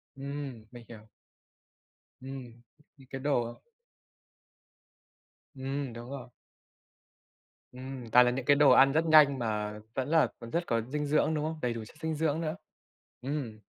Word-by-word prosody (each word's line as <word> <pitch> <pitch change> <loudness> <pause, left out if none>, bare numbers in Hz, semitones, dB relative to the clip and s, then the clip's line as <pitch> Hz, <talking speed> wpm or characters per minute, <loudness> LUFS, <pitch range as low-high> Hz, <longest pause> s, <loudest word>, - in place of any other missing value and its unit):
Ừm, 135 -4 -6
mình 120 -2 -12
hiểu. 110 -2 -12 1.1
Ừm, 130 -3 -9 0.4
những 135 -2 -17
cái 135 -1 -5
đồ 120 -5 -1 1.9
Ừm, 135 -1 -4
đúng 120 +2 -9
rồi. 130 -3 -7 1.4
Ừm, 130 -2 -8
toàn 125 +1 +7
là 125 - +2
những 130 0 -4
cái 145 - +5
đồ 145 -1 +6
ăn 135 +2 +7
rất 160 +3 +2
nhanh 150 -4 +6
mà 105 -2 -2 0.2
vẫn 130 +2 -2
là 160 -1 +4
còn 115 - -9
rất 170 +1 0
có 115 -1 +1
dinh 145 +5 -3
dưỡng, 155 +2 +2
đúng 150 -1 -1
không? 160 0 -4
Đầy 120 -1 0
đủ 115 - -6
chất - - -16
dinh 160 -1 -2
dưỡng 160 +1 0
nữa. 155 +1 -2 0.7
Ừm. 130 -5 -4
135 Hz, 155 wpm, -30 LUFS, 120-145 Hz, 1.9 s, toàn